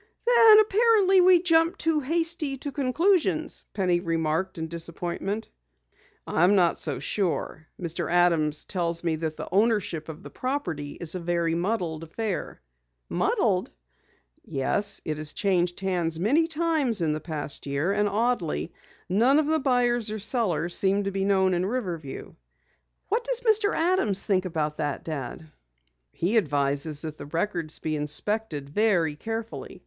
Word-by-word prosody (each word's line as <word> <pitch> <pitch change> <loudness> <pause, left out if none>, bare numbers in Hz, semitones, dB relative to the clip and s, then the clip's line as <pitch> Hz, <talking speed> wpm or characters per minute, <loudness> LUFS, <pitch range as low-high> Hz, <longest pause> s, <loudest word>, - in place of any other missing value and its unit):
"Then 455 -3 +7
apparently 420 -3 +4
we 360 -1 +5
jumped 330 +1 +3
too 320 -2 +1
hasty 325 -1 -1
to 285 +2 -5
conclusions," 285 - +1
Penny 180 -3 +1
remarked 165 +1 -1
in 160 0 -3
disappointment. 170 +5 -4 0.8
"I'm 180 +5 +3
not 175 -3 +2
so 145 -5 -2
sure. 160 0 -2
Mr. 170 -1 -3
Adams 165 -4 +2
tells 170 -3 -1
me 165 -2 0
that 155 -1 -4
the - - -6
ownership 195 -6 +1
of 155 - -9
the - - -10
property 175 - -3
is 165 -2 -2
a 185 - -3
very 170 -1 0
muddled 170 -3 -2
affair." 190 - -4 0.5
"Muddled?" - - +1 0.7
"Yes, 200 +9 -1
it 155 -1 -2
has 155 0 -1
changed 180 -3 0
hands 175 -4 -1
many 285 - +2
times 310 - +1
in 155 - +1
the 155 - -2
past 150 -3 -4
year, 140 +6 0
and 205 0 +1
oddly, 205 -7 -1 0.3
none 235 +10 +3
of 310 - +3
the 315 +1 +1
buyers 245 -4 +1
or 215 - -3
sellers 195 - -1
seem 195 +1 +2
to 195 - -2
be 195 0 -1
known 190 -2 +3
in 175 0 0
Riverview." 185 - -4 0.8
"What 455 +4 0
does - - 0
Mr. 435 -3 +3
Adams 325 - +2
think 190 -3 +1
about 155 -4 -2
that, 145 -3 -3
Dad?" 155 +1 -6 0.6
"He 195 +7 0
advises 145 -3 0
that 155 -1 -6
the 145 - -8
records 165 0 -2
be 155 -1 -3
inspected 150 +1 -2
very 175 -2 +1
carefully. 225 +6 -6
190 Hz, 150 wpm, -26 LUFS, 160-250 Hz, 0.8 s, Then